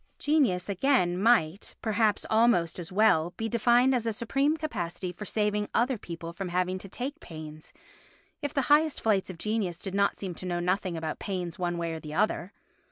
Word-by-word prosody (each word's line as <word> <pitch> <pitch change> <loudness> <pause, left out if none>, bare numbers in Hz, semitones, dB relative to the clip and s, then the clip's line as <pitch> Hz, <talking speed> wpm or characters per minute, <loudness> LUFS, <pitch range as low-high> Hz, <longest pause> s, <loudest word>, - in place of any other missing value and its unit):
Genius, 270 -13 +2
again, 200 -3 +2
might, 200 -3 +2
perhaps 215 -1 +1
almost 220 -7 +3
as 170 0 -6
well, 180 -4 +3
be 225 - -2
defined 240 +3 +4
as 235 -3 0
a - - +2
supreme 275 +7 0
capacity 180 - -4
for 195 +4 -8
saving 210 0 0
other 250 +3 +2
people 170 -5 -7
from 185 +1 -5
having 180 +1 0
to 195 - -10
take 275 - -5
pains, 155 - -10 0.7
if 290 -2 -2
the 275 -3 0
highest 310 0 +3
flights 205 -4 +1
of 185 - -7
genius 210 -3 -1
did 190 +1 -5
not 200 0 +2
seem 190 -3 -5
to 185 - -7
know 175 -1 -1
nothing 180 0 -1
about 160 -1 -4
pains 180 -4 -4
one 175 -1 -1
way 170 -1 -2
or 160 - -5
the 155 -1 -8
other. 200 -1 0
195 Hz, 190 wpm, -28 LUFS, 175-230 Hz, 0.7 s, defined